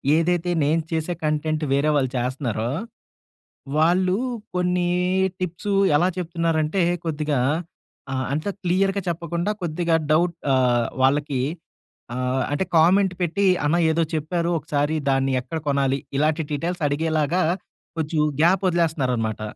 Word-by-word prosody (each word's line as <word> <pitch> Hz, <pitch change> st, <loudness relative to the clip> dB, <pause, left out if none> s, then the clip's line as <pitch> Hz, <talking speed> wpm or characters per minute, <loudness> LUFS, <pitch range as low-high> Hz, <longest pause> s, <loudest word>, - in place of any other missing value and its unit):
ఏదైతే 175 Hz, +1 st, +1 dB
నేను 155 Hz, +3 st, +2 dB
చేసే 160 Hz, +2 st, -1 dB
కంటెంట్ 155 Hz, +1 st, 0 dB
వేరే 145 Hz, +2 st, +2 dB
వాళ్ళు 135 Hz, -3 st, +2 dB
చేస్తున్నారో, 120 Hz, -3 st, -2 dB, 1.1 s
వాళ్ళు 180 Hz, +3 st, +3 dB, 0.4 s
కొన్ని 180 Hz, 0 st, +1 dB, 0.5 s
టిప్స్ 185 Hz, +3 st, -3 dB, 0.2 s
ఎలా 175 Hz, +4 st, +3 dB
చెప్తున్నారంటే, 165 Hz, 0 st, 0 dB, 0.2 s
కొద్దిగా 150 Hz, -3 st, -1 dB, 0.7 s
ఆహ్, 130 Hz, 0 st, -1 dB
అంత 155 Hz, +7 st, -2 dB, 0.2 s
క్లియర్‌గా 195 Hz, +3 st, +1 dB
చెప్పకుండా, 170 Hz, +2 st, -2 dB
కొద్దిగా 170 Hz, 0 st, +1 dB, 0.2 s
డౌట్ 170 Hz, +2 st, +2 dB, 0.2 s
ఆహ్, 120 Hz, -2 st, +3 dB, 0.2 s
వాళ్ళకి 140 Hz, 0 st, +2 dB, 0.8 s
ఆహ్, 130 Hz, +1 st, 0 dB
అంటే 145 Hz, -, 0 dB
కామెంట్ 185 Hz, +4 st, +4 dB
పెట్టి 185 Hz, +4 st, +1 dB, 0.2 s
అన్న 155 Hz, +4 st, +2 dB, 0.2 s
ఏదో 165 Hz, +1 st, +1 dB
చెప్పారు. 170 Hz, +2 st, -1 dB
ఒకసారి 145 Hz, 0 st, -1 dB, 0.2 s
దాన్ని 135 Hz, 0 st, +1 dB
ఎక్కడ 160 Hz, +6 st, -5 dB
కొనాలి? 135 Hz, -1 st, +1 dB, 0.2 s
ఇలాంటి 155 Hz, +2 st, +1 dB
డీటెయిల్స్ 170 Hz, +4 st, -2 dB
అడిగేలాగా 160 Hz, +3 st, 0 dB, 0.6 s
కొంచెం 155 Hz, 0 st, 0 dB, 0.2 s
గ్యాప్ 180 Hz, +3 st, +4 dB
వదిలేస్తున్నారనమాట. 130 Hz, -, 0 dB
160 Hz, 115 wpm, -23 LUFS, 145-175 Hz, 1.1 s, కామెంట్